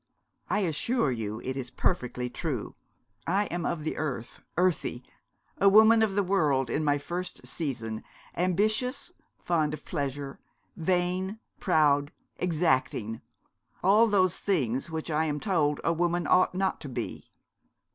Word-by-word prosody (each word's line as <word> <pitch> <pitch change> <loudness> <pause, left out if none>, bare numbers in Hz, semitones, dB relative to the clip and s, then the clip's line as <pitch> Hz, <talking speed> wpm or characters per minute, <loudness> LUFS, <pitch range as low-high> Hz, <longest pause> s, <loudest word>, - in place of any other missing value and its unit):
'I 210 - +2
assure 180 - +1
you 110 -2 -4
it 130 +1 -3
is 130 -2 -4
perfectly 125 -7 -1
true. 130 -2 -4 0.5
I 195 +4 +2
am 175 -1 -1
of 160 -3 -2
the 155 - -3
earth, 135 -6 -4 0.2
earthy; 175 -8 +1 0.6
a 200 - +6
woman 220 +2 +7
of 210 -3 +2
the 205 - +3
world, 145 -10 +1
in 155 - 0
my 145 -1 +3
first 175 +5 -5
season, 115 -8 -4 0.3
ambitious, 215 - 0 0.3
fond 155 -3 0
of - - -15
pleasure, 140 -3 -4 0.4
vain, 185 +4 0 0.2
proud, 145 -5 +3 0.3
exacting, 130 -10 0 0.6
all 210 +5 +6
those 185 -4 +2
things 135 - 0
which 160 0 -4
I 155 +1 +2
am 150 -1 -1
told 155 -7 +1
a 170 - +2
woman 175 0 0
ought 185 +3 +4
not 190 0 0
to 145 - -6
be.' 120 -2 -5
160 Hz, 140 wpm, -28 LUFS, 140-185 Hz, 0.6 s, woman